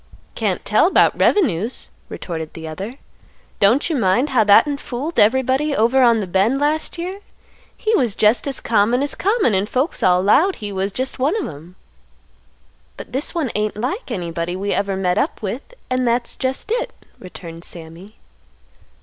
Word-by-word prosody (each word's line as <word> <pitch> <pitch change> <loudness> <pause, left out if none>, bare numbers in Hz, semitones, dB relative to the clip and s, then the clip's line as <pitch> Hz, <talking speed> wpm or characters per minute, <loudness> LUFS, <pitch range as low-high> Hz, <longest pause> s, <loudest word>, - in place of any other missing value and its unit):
"Can't 205 -5 -2
tell 215 - +4
'bout - - +3
revenues," 235 - +1 0.2
retorted 160 -3 -6
the 160 -1 -7
other. 195 +10 -6 0.6
"Don't 220 +8 +4
you 330 - -1
mind 235 +4 +2
how 245 -4 +4
that'n 245 +8 +5
fooled 280 +5 -4
everybody 265 +6 +2
over 240 +4 +3
on 235 -2 +5
th' 180 - -8
bend 210 +9 +2
last 305 +4 0
year? 365 +3 -5 0.6
He 440 -1 0
was 245 - +1
jest 215 +4 +3
as 275 - -2
common 230 +4 +2
as 285 - -1
common, 405 - +1
and 195 +2 0
folks 265 +6 -1
all 180 0 +3
'lowed 320 - +4
he 210 -1 -6
was 195 +1 -2
just 260 +5 -4
one 285 +9 +1
of - - -3
'em." 160 +4 -11 1.2
"But - - -10
this 275 +6 -1
one 300 -9 -1
ain't 210 0 -1
like 265 - -3
anybody 170 -5 -3
that - - -6
we 200 +1 -1
ever 200 -1 -1
met 185 0 +1
up - - -1
with, 235 - -5 0.2
and 255 -1 0
that's 235 0 0
jest 265 +10 -3
it," 485 +1 -3
returned 170 -2 -10
Sammy. 170 +5 -10
230 Hz, 175 wpm, -20 LUFS, 190-280 Hz, 1.2 s, that'n